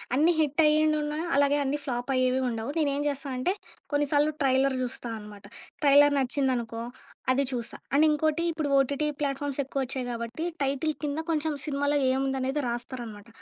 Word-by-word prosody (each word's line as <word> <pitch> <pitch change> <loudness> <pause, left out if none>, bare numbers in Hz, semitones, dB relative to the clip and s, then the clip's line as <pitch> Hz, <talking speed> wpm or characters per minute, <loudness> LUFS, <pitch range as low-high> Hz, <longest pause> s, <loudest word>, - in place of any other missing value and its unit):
అన్నీ 310 +5 +4
హిట్ 300 0 +2
అయ్యిండుంన, 305 0 +2 0.2
అలాగే 285 0 +4
అన్ని 280 +2 0
ఫ్లాప్ 245 -2 -3
అయ్యేవి 255 0 +2
ఉండవు. 230 +2 -3
నేనేం 285 -2 +1
జెస్తా 280 0 -4
అంటే 305 +9 +1 0.4
కొన్ని 290 0 +2
సార్లు 295 +1 +3
ట్రైలర్ 265 0 +3
చూస్తా 245 -1 -5
అనమాట. 210 -1 -12 0.4
ట్రైలర్ 290 0 +6
నచ్చిందనుకో 250 -4 -1 0.5
అది 275 +2 +2
చూస్తా. 240 -2 -4 0.2
అండ్ 295 +3 +5
ఇంకోటి 310 +2 +1
ఇప్పుడు 310 -3 -2
ఓటీటీ 280 +3 +1
ప్లాట్ఫామ్స్ 280 0 -2
ఎక్కువొచ్చాయి 265 -1 -3
గాబట్టి 235 +6 -4 0.2
టైటిల్ 275 +3 0
కింద 295 +1 -1
కొంచెం 315 -1 0
సినిమాలో 285 0 0
ఏముందనేది 265 +1 0
రాస్తారనమాట. 235 -3 -6
275 Hz, 150 wpm, -27 LUFS, 255-295 Hz, 0.5 s, ట్రైలర్